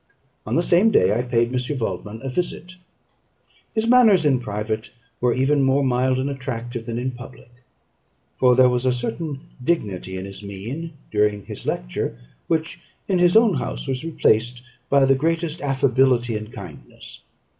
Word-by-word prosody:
On 115 - -1
the 170 - +2
same 180 +6 +4
day, 100 - +3
I 120 - +1
paid 120 -1 0
M. 125 +3 -2
Waldman 110 -2 -4
a 135 - -3
visit. 180 +4 -4 1.0
His 220 0 +1
manners 225 -8 +5
in 135 -4 +3
private 110 -1 -4 0.3
were 125 0 +2
even 140 +2 +2
more 135 +1 +3
mild 130 0 +1
and 130 +1 -1
attractive 120 -4 -5
than 115 0 -3
in 130 +2 -2
public; 120 0 -12 0.9
for 125 -1 +5
there 130 0 +6
was 125 +1 0
a - - +4
certain 130 +4 -4 0.2
dignity 100 - -2
in 95 - -5
his 100 0 -9
mien 115 - -6 0.2
during 105 -1 +1
his - - -8
lecture, - - -3 0.3
which 165 +1 -2 0.3
in 185 -3 +1
his 175 +3 +5
own 225 -3 +5
house - - -4
was 130 +1 -2
replaced 120 -6 +1 0.3
by 140 -1 +5
the 135 - +5
greatest 165 +3 -1
affability 130 -3 +2
and 110 +1 -6
kindness. 90 -10 -11
125 Hz, 165 wpm, -22 LUFS, 115-150 Hz, 1.0 s, there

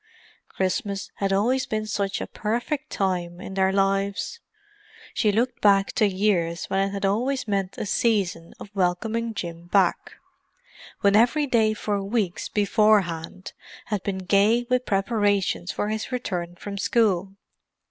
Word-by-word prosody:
Christmas 195 +1 -2
had 195 -1 -1
always 250 +7 +1
been 215 -3 -2
such 200 -1 -2
a - - -2
perfect 245 +7 -3
time 180 -3 -1
in 190 - -7
their 190 0 +2
lives: 195 - 0 0.7
she 215 - +2
looked 240 +5 0
back 200 -1 +4
to 215 - +2
years 185 -4 0
when 195 - +2
it 195 0 +1
had 200 0 -2
always 245 +6 0
meant 195 -2 -2
a - - -3
season 195 -6 0
of 200 - -10
welcoming 215 +5 0
Jim 170 -2 -6
back; 185 -1 +1 0.9
when 200 0 +4
every 245 +7 +4
day 230 -5 +3
for 205 -1 -2
weeks 195 -4 -2
beforehand 200 -4 +1 0.4
had 205 - 0
been 195 0 -3
gay 200 +5 +3
with 250 0 +1
preparations 200 -3 +1
for 205 - -2
his 220 +3 -3
return 180 -8 -3
from 200 +2 -7
school. 195 -4 +1
200 Hz, 145 wpm, -24 LUFS, 190-220 Hz, 0.9 s, back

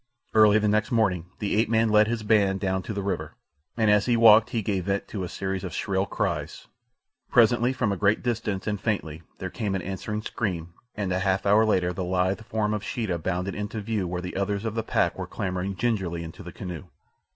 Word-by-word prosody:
Early 110 -1 +6
the 105 0 +1
next 105 +1 +1
morning 95 -7 +1
the 105 -1 -1
ape 110 0 +2
man 115 0 +3
led 105 0 +5
his 115 -1 -2
band 100 -3 +3
down 95 -1 -1
to 95 - -6
the 100 -1 -3
river, 85 -6 -3 0.4
and 110 -2 +3
as 105 +1 +3
he 120 -1 +3
walked 110 0 +7
he 115 -2 -2
gave 95 -3 -1
vent 100 0 -1
to 100 -4 -4
a 90 - -4
series 95 +1 -3
of 90 -3 -5
shrill 95 -1 -1
cries. 85 -9 -3 0.6
Presently 120 +1 +4
from 125 -5 0
a 100 - -1
great 105 +3 +2
distance 110 -5 -2
and 105 -2 -2
faintly 80 -8 -2 0.2
there 95 -1 -5
came 105 -4 -2
an 95 - -3
answering 105 +3 -4
scream, 85 -8 -3 0.2
and 100 -3 -2
a 95 - 0
half 95 0 0
hour 105 +2 +5
later 90 -4 +1
the 95 - -3
lithe 95 +3 0
form 110 -2 -1
of 105 -1 -3
Sheeta 110 -9 -2
bounded 90 +3 -2
into 105 +3 -4
view 105 -3 -2
where 90 0 -3
the 90 - -6
others 100 +2 -1
of 110 - -2
the 115 - -1
pack - - 0
were - - -4
clambering 95 0 -3
gingerly 95 -7 -1
into 80 -1 -9
the 90 - -8
canoe. 90 -2 -7
100 Hz, 220 wpm, -26 LUFS, 95-110 Hz, 0.6 s, walked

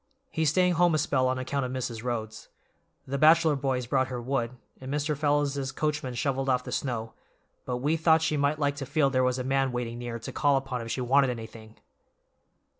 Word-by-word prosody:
He's 160 -2 +1
staying 180 +3 +3
home 175 -1 +3
a - - +3
spell 140 -4 +1
on 130 0 0
account 135 +2 -2
of 125 - -3
Mrs. 120 -3 -4
Rhodes. 110 -3 -4 0.6
The 140 +1 -3
Batchellor 160 0 +5
boys 130 -2 -1
brought 130 +1 +1
her 125 -2 -4
wood, 120 -1 -1 0.3
and 130 0 -7
Mr. 150 +1 -1
Fellows's 145 -2 0
coachman 150 -5 -2
shoveled 135 +1 -1
off 125 -1 +2
the - - -7
snow, 115 -4 -3 0.5
but 125 -1 -2
we 150 +6 0
thought 160 0 +4
she 160 -1 +1
might 145 +1 +1
like 145 -1 0
to 135 -2 -5
feel 140 -1 +2
there 130 -1 +2
was 125 0 +1
a 130 - -2
man 135 0 +1
waiting 120 -1 -4
near 120 -1 -4
to 115 - -7
call 145 -2 +2
upon 135 -2 -3
if 115 - -7
she 130 - -2
wanted 135 +2 +3
anything." 110 -2 -8
135 Hz, 210 wpm, -27 LUFS, 125-145 Hz, 0.6 s, Batchellor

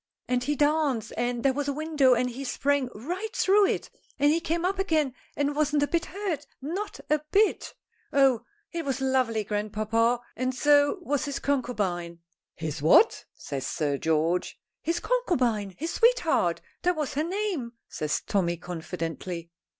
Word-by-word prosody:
And 250 0 +1
he 295 +3 0
danced, 290 -6 +1
and 240 -1 -1
there 270 -1 +4
was 290 +1 -2
a 285 - 0
window 295 -4 +3
and 250 +1 +1
he 250 +3 -6
sprang 275 0 0
right 360 - -5
through 400 +1 +4
it, - - -2 0.3
and 290 +1 +4
he 325 - +2
came 335 +1 -1
up 385 +1 0
again 315 -8 +1 0.2
and 285 0 0
wasn't 295 -1 +2
a - - +2
bit 340 +1 0
hurt, 355 -8 -4
not 350 +10 -4
a 305 -1 +3
bit. 420 +1 +2 0.4
Oh! 265 -4 +4 0.3
he 340 - -3
was 275 -4 -2
lovely, 255 -5 +1
grandpapa, 215 +3 0 0.2
and 255 +2 -1
so 290 +5 +4
was 290 -1 0
his 280 -1 -3
concubine 200 -11 -1 0.2
" - - -66
"His 150 -3 -3
what?" 275 - +5
says 135 -2 -5
Sir 145 -2 -1
George. 160 +2 0 0.2
"His 335 +2 -1
concubine. 250 - 0
His 325 +3 -3
sweetheart. - - +3 0.2
That 355 0 +2
was 300 -4 -2
her 295 - 0
name," 350 - -2
says 150 -1 -2
Tommy 175 -4 0
confidently. 170 0 -5
275 Hz, 165 wpm, -27 LUFS, 215-315 Hz, 0.4 s, what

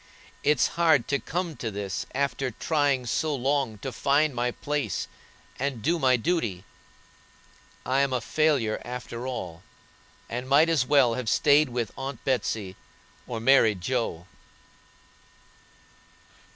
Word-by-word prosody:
It's 150 -3 +3
hard 155 -7 +4
to 140 - +1
come 175 -1 -3
to 115 - -3
this 100 -2 -4
after 140 -1 -1
trying 140 +1 0
so 150 +5 0
long 135 -3 0
to 135 - -2
find 140 +4 +2
my 125 0 0
place, 145 - -3 0.5
and 130 -4 -2
do 170 +3 +1
my 130 -3 +4
duty. 115 - -1 1.2
I'm 135 +1 +2
a 125 - +1
failure 135 -3 +1
after 125 0 -6
all, 90 -10 -5 0.7
and 125 +2 -5
might 150 +4 +5
as 145 -6 +2
well 135 -5 +4
have 125 -2 -3
stayed 145 +8 +4
with 120 -2 -3
Aunt 135 -2 -6
Betsey 110 -7 -1 0.5
or 120 -2 -4
married 115 -5 +4
Joe." 115 -6 -2
130 Hz, 125 wpm, -26 LUFS, 115-145 Hz, 1.2 s, might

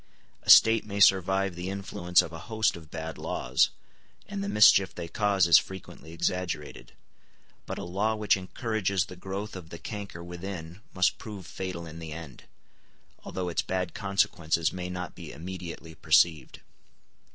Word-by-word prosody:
A - - -9
State 115 0 +8
may 100 -1 -5
survive 95 0 +4
the 90 +2 -5
influence 95 -3 +1
of 80 - -8
a 80 - -7
host 110 -1 +1
of 80 -3 -12
bad 80 0 -6
laws, - - +1 0.6
and 200 -1 -4
the 200 - -3
mischief 100 - +6
they 85 - -5
cause 100 0 +2
is 85 -2 +8
frequently 95 -3 -10
exaggerated; 85 -3 -3 0.7
but - - -4
a - - -5
law 100 +5 0
which 105 -2 +3
encourages 100 -1 -1
the 90 - -10
growth 95 +3 -6
of 90 -4 -9
the 85 - -8
canker 100 -3 -7
within 90 0 -7
must 90 0 +1
prove 105 -5 -8
fatal 90 -3 -5
in 80 0 -9
the 80 -2 -7
end, 80 -5 -10 0.8
although 95 -1 -4
its 85 - 0
bad 95 0 -2
consequences 85 -5 0
may 90 0 -5
not 90 -3 -5
be - - -9
immediately 85 -1 -8
perceived. 80 +1 +2
90 Hz, 160 wpm, -28 LUFS, 85-100 Hz, 0.8 s, State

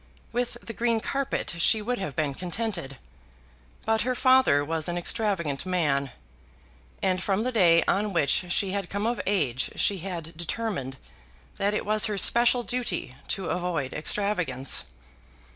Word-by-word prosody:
With 240 0 -2
the 230 - -6
green 230 +1 +1
carpet 275 -1 -2
she 220 +6 +4
would 245 +3 -2
have 190 -8 -4
been 150 -3 0
contented. 175 - -4 0.9
But 220 0 +2
her 255 +1 0
father 255 - +4
was 160 0 -1
an 175 0 -2
extravagant 175 - -1
man; 150 -7 +1 0.9
and 185 -1 +1
from 195 +2 0
the 255 - -1
day 170 -7 +5
on 205 +1 +1
which 175 +1 +1
she 190 +1 +1
had 195 -2 -3
come 200 +1 -2
of 235 +1 0
age 140 -11 +1
she 200 -2 +2
had 170 -2 -6
determined 170 - -3 0.6
that 205 +1 +1
it - - -2
was 215 +1 +3
her 210 -1 -2
special 240 +4 +4
duty 240 - -2
to 190 -4 -2
avoid 175 -7 -2
extravagance. 155 - -1
190 Hz, 150 wpm, -26 LUFS, 165-220 Hz, 0.9 s, day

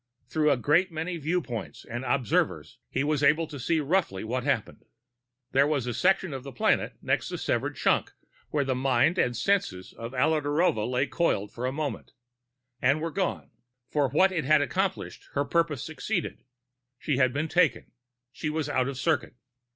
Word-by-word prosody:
Through 155 -1 +2
a 140 - +3
great 165 +9 +2
many 165 +2 -3
viewpoints 155 -7 -3
and 120 +2 -5
observers, 130 -3 0
he 135 - -1
was 150 -1 0
able 150 +3 +4
to 150 -3 -9
see 160 +6 +1
roughly 150 - 0
what 125 +3 -2
happened. 135 -6 -1 0.7
There 135 +2 +4
was 145 -5 0
a 120 - -2
section 185 - +2
of 135 - -5
the 140 +1 -8
planet 120 - +1
next - - 0
the - - -4
severed - - -1
chunk - - +1 0.4
where 145 -2 +1
the 130 - +1
mind 135 +6 +2
and 120 -2 +1
senses 125 - 0
of 115 +3 -7
Alla 155 +4 +2
Narova 145 -7 +1
lay 125 +2 +1
coiled 105 - 0
for 125 +2 -3
a - - -1
moment 145 +1 -4 0.7
and 140 +4 +3
were 165 +1 -3
gone. 185 +2 -2 0.4
For 145 -3 +2
what 185 +8 +4
it 170 -4 -1
had 150 +1 +4
accomplished, 190 +5 -2
her 140 0 0
purpose 160 -2 0
succeeded. 170 +3 -3 0.5
She 145 0 -1
had 130 -2 +4
been 145 +5 -1
taken. 155 -10 +1 0.4
She 150 - -4
was 155 -1 -2
out 130 0 +1
of 135 -2 -4
circuit. 155 -4 0
145 Hz, 180 wpm, -27 LUFS, 130-160 Hz, 0.7 s, able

